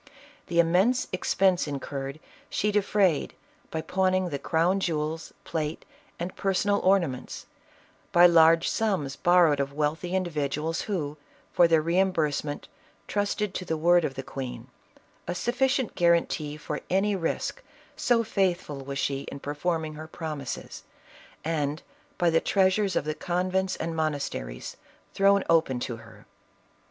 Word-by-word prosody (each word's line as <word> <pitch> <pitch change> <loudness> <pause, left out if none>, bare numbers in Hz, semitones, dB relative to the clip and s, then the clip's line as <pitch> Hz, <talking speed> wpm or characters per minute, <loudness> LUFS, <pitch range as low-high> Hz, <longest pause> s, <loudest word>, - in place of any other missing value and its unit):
The 170 - 0
im 165 -1 +4
mense 220 +8 +3
expense 185 -1 +2
incurred, 140 0 -5 0.3
she 210 - 0
defrayed 200 -5 +1 0.3
by 160 - -3
pawning 185 +2 +1
the 140 -3 -3
crown 170 +6 +1
jewels, 160 -2 -2
plate, 155 -1 -3 0.3
and 175 +2 -5
personal 200 +1 +1
ornaments; 175 -9 0 0.7
by 175 0 +7
large 165 -1 +6
sums 185 -12 0
borrowed 175 -4 +4
of 140 0 -2
wealthy 155 +5 -1
individuals 160 -2 -1
who, 155 -7 -2 0.4
for 175 - +6
their 165 -2 +3
reimbursement, 160 -4 0 0.4
trusted 205 0 -1
to 185 - -4
the 160 -3 -2
word 175 +2 +4
of 135 - -2
the 135 - -5
queen 125 -2 -7 0.3
— - - -30 0.2
a 175 - -2
sufficient 255 +3 0
guarantee 170 -3 +1
for 150 0 -5
any 195 +2 +2
risk, 190 - -2 0.3
so 235 -2 +2
faithful 180 -9 -1
was 140 +1 -5
she 135 +1 -2
in - - -7
performing 155 +2 -2
her 155 +1 -8
promises; 155 -5 -6 0.6
and 150 -1 -1 0.3
by 175 -1 +3
the 165 - +3
treasures 195 0 +2
of - - 0
the 155 - -1
convents 185 +3 -1
and 165 0 -4
monasteries, 145 - -3 0.4
thrown 200 0 +4
open 160 -6 +3
to 120 -1 -4
her. 110 0 -15
165 Hz, 140 wpm, -27 LUFS, 150-185 Hz, 0.7 s, by